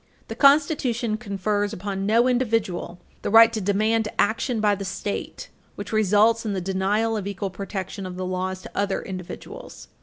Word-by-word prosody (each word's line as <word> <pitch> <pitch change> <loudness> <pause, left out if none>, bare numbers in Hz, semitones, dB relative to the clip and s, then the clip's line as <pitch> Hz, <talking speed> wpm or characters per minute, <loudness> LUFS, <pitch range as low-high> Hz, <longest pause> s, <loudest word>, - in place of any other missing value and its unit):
The - - -5
Constitution 275 -6 +3
confers 205 -1 -2
upon 195 0 -4
no 230 +3 +4
individual 225 -8 -1 0.2
the - - -2
right 225 +2 +7
to 220 - -2
demand 215 +3 +1
action 230 +1 +1
by 210 -1 +3
the 200 0 -4
State 200 +1 -5 0.3
which - - -7
results 215 +2 +3
in 215 -3 -2
the 190 - -1
denial 195 +5 0
of 205 -2 -3
equal 200 -1 -4
protection 195 0 -5
of 180 - -7
the 185 0 -4
laws 185 0 -3
to - - -10
other 200 -1 -1
individuals. 185 - -9
205 Hz, 170 wpm, -24 LUFS, 190-225 Hz, 0.3 s, right